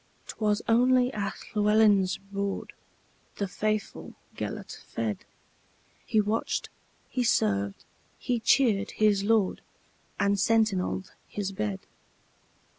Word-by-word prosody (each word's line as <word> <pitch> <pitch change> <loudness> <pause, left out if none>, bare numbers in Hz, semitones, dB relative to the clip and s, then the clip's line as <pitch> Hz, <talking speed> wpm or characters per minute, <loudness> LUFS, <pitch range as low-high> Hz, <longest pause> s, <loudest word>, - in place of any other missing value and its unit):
'T - - -7
was 210 -1 +1
only 250 +2 +4
at 200 -1 -3 0.2
Llewelyn's 210 -3 +4 0.2
boardThe 200 0 -6
faithful 215 +2 -3 0.2
Gêlert - - -5
fed; 110 -4 -4 0.8
He 215 - +2
watched, 210 +2 -1 0.4
he 250 - -1
served, 100 - +1 0.3
he 245 -1 -1
cheered 220 -4 +3
his 210 -2 +3
lord, 215 -2 +2 0.6
And 200 0 +2
sentineled 210 -4 +1 0.2
his 200 -2 -4
bed. 105 - -3
210 Hz, 100 wpm, -28 LUFS, 195-225 Hz, 0.8 s, only